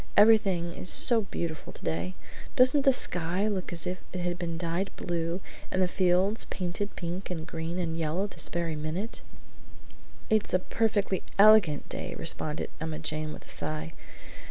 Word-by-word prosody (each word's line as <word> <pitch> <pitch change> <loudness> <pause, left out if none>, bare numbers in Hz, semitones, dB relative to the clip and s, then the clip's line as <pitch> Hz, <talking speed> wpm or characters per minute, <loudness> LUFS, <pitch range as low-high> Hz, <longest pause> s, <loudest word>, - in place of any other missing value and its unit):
Everything 195 -5 +5
is 180 - -6
so 235 -3 +4
beautiful 170 -5 -5
today! 85 +3 -4 0.4
Doesn't 265 +1 +5
the 270 - +7
sky 180 -4 +4
look 195 -4 -2
as 170 0 +1
if 180 0 -4
it 180 - -4
had 175 0 -2
been 170 -2 -3
dyed 175 +3 -2
blue 170 +1 -2 0.3
and 185 - -1
the 185 - +3
fields 185 +4 +2
painted 185 +3 -3
pink 175 +2 -5
and 165 -3 -4
green 165 +1 -4
and 165 -3 -2
yellow 165 +4 -1
this 205 - -2
very 170 -2 -2
minute?" 155 +9 -4 1.1
"It's 215 -3 +2
a - - +7
perfectly 205 0 0 0.2
elegant 200 -7 +6
day!" - - -4
responded 150 0 -2
Emma 160 -1 -3
Jane 155 0 -3
with - - -10
a - - -12
sigh. 75 +1 -3
175 Hz, 160 wpm, -28 LUFS, 165-200 Hz, 1.1 s, the